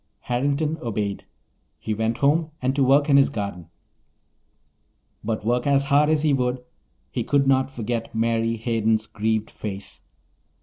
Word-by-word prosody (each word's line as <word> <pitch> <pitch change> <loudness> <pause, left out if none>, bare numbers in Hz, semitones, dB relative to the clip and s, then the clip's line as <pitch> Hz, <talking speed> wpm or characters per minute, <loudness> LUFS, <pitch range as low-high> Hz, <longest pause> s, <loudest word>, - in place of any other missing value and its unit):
Harrington 145 +5 -1
obeyed. 105 -4 -3 0.5
He 110 - -3
went 110 +2 -1
home 155 +3 +2
and 130 +1 0
to 140 - +3
work 140 +3 +4
in 140 -2 +5
his 140 - +5
garden. 100 -6 -5 1.6
But 110 -1 -3
work 120 +3 +1
as 140 0 +3
hard 150 +1 +5
as 155 -1 +2
he 150 -2 +3
would, 125 -1 -1 0.5
he - - -2
could 140 -1 +2
not 135 0 +3
forget 115 -3 -4
Mary 115 0 +1
Hayden's 110 -1 0
grieved 110 0 -2
face. 100 -2 -7
120 Hz, 145 wpm, -23 LUFS, 110-140 Hz, 1.6 s, in